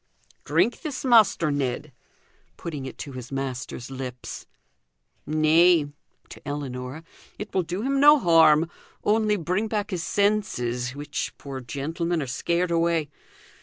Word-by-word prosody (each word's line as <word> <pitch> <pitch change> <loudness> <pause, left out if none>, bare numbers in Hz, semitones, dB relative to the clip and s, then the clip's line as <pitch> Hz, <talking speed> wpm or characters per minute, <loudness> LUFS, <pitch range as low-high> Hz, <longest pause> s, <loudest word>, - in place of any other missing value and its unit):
"Drink 240 - +1
this, 285 -3 -5
Master 220 - +5
Ned!" 140 +1 -2 0.7
putting 145 -5 -5
it - - -9
to 140 - -7
his 125 -1 -8
master's 135 -1 -5
lips. 130 -2 -7 0.8
"Nay" 155 0 +4 0.4
to - - -11
Ellinor 140 0 -5 0.3
"it 210 - -7
will 190 - +2
do 180 +4 -4
him 275 +1 +1
no 295 +2 +8
harm; 165 - +5 0.4
only 215 0 +2
bring 185 +5 -1
back 210 -1 -2
his 180 -3 -2
senses, 130 - 0
which, 145 +1 -4
poor 135 -2 -7
gentleman, 160 +7 -2
are 145 - -2
scared 170 +7 -1
away. 165 -3 +1
160 Hz, 130 wpm, -25 LUFS, 135-190 Hz, 0.8 s, no